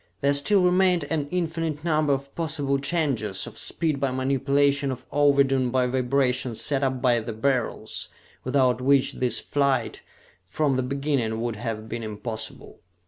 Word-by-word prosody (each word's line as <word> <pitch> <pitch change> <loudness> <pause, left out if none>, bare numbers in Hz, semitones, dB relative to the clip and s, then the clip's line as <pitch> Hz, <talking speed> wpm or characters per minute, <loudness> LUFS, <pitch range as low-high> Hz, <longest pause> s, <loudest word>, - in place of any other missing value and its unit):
There 140 +1 +3
still 180 +7 +3
remained 180 -1 +3
an 150 -3 -1
infinite 165 -3 -2
number 155 -3 +1
of 140 0 -2
possible 150 -4 -1
changes 135 - -1
of - - -10
speed 155 -4 -1
by 135 -1 0
manipulation 140 +2 +1
of 130 - -7
ovidum 140 -3 +3
by 130 0 +2
vibration 125 -1 0
set 135 +5 0
up 130 -1 -1
by 120 -2 +4
the 115 0 -5
Beryls, 115 -2 -2 0.3
without 130 -1 +2
which 135 +1 +3
this 125 -1 +1
flight 140 -2 0 0.4
from 140 - 0
the 130 - +1
beginning 135 -4 -1
would 120 -2 -3
have 110 -1 -5
been 115 +1 -5
impossible. 110 +1 -6
135 Hz, 150 wpm, -25 LUFS, 125-145 Hz, 0.4 s, by